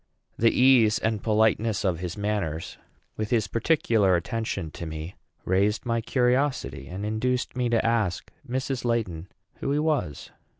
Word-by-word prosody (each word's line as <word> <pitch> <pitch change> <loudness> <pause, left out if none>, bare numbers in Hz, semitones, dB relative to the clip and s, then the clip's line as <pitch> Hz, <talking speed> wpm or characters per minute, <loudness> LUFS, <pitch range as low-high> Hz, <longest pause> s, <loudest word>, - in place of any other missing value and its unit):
The 115 - +4
ease 125 -4 +5
and 110 -2 -1
politeness 110 0 +2
of 90 -3 0
his 90 0 -5
manners, 100 -6 -3 0.4
with 110 -1 -2
his 115 -4 +2
particular 110 - +2
attention 95 -2 -3
to 85 - -7
me, 80 +3 -6 0.3
raised 100 +5 +1
my 115 -1 0
curiosity, 125 - 0
and 95 +6 -5
induced 125 +5 -1
me 125 -1 0
to 115 -1 +1
ask 110 -6 0 0.2
Mrs. 130 +1 -2
Laiton 100 -8 -1 0.3
who 140 - -2
he 145 - +1
was. 150 - -1
110 Hz, 145 wpm, -26 LUFS, 95-125 Hz, 0.4 s, ease